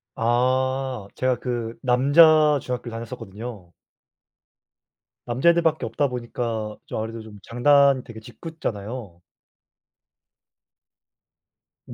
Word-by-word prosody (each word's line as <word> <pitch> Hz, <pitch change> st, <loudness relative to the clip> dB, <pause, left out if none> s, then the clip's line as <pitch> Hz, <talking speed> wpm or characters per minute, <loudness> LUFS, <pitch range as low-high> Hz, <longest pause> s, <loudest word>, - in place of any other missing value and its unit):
아. 130 Hz, 0 st, 0 dB
제가 130 Hz, -1 st, 0 dB
그 120 Hz, -2 st, -4 dB
남자 150 Hz, +4 st, +5 dB
중학교 125 Hz, -1 st, -4 dB
다녔었거든요. 115 Hz, -4 st, -8 dB, 1.5 s
남자애들밖에 160 Hz, +6 st, +2 dB
없다 145 Hz, -, 0 dB
보니까 115 Hz, -3 st, -4 dB
좀 -, -, -5 dB
아무래도 115 Hz, +1 st, -5 dB
좀 110 Hz, -2 st, -12 dB
장난 140 Hz, +2 st, +4 dB
되게 115 Hz, -2 st, -10 dB
짓궂잖아요. 110 Hz, -, -7 dB, 2.7 s
네. -, -, -9 dB
125 Hz, 210 characters per minute, -23 LUFS, 115-135 Hz, 2.7 s, 남자